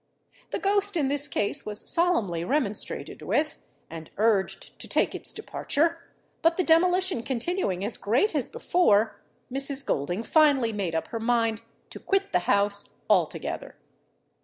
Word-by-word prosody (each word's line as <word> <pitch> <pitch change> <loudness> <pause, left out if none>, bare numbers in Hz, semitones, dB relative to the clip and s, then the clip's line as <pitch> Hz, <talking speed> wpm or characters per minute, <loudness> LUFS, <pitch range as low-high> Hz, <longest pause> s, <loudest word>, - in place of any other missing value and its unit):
The - - -2
ghost 405 -1 +1
in 280 -4 +1
this 285 +1 +1
case 210 -7 -1
was 210 -1 -5
solemnly 230 - +1
remonstrated 215 - -2
with, 305 0 0 0.3
and 160 -1 -9
urged 210 -2 0
to - - -6
take - - +1
its - - -5
departure; 330 +3 -1 0.4
but 330 +1 +3
the 370 - +2
demolition 360 -2 +3
continuing 235 - -2
as 220 - -3
great 255 - +1
as 290 -5 -1
before, 290 - +2 0.3
Mrs. 275 0 -2
Golding 175 +10 -1
finally 270 -4 +4
made 190 -6 -2
up 160 - -2
her 230 - -4
mind 230 -1 +1 0.3
to - - -8
quit 390 0 0
the - - +3
house 200 0 +1 0.2
altogether. 180 -6 0
245 Hz, 145 wpm, -27 LUFS, 205-335 Hz, 0.4 s, finally